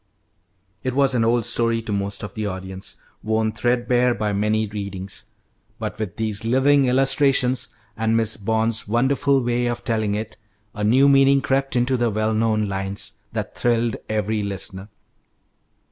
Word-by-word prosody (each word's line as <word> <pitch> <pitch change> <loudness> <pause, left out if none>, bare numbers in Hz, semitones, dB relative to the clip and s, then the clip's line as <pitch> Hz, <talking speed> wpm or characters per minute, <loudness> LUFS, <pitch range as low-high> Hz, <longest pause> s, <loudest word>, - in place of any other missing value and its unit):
It 130 -1 -3
was 135 -1 +3
an 120 -2 +2
old 115 0 +2
story 115 -1 +1
to 110 - -4
most 100 0 -2
of 105 - -6
the 110 -1 -3
audience, 95 0 -6 0.3
worn 110 0 0
threadbare 120 +1 +1
by 105 0 -1
many 105 +2 +1
readings, 100 -2 -6 0.5
but - - -5
with 105 -4 -4
these 110 -2 -1
living 135 +4 +3
illustrations, 135 -2 +2 0.2
and 110 0 +1
Miss 110 -1 +2
Bond's 110 +1 -1
wonderful 135 +4 +2
way 120 0 0
of 120 0 -3
telling 110 -3 0
it, 110 +1 -5 0.4
a 105 - -4
new 130 +6 +5
meaning 135 0 +5
crept 135 0 0
into 125 +2 +2
the 120 -1 +1
well 110 +1 0
known 110 -1 +1
lines, 95 0 -3
that - - -4
thrilled 120 -2 +1
every 110 0 -1
listener. 100 0 -5
115 Hz, 155 wpm, -22 LUFS, 105-125 Hz, 0.5 s, new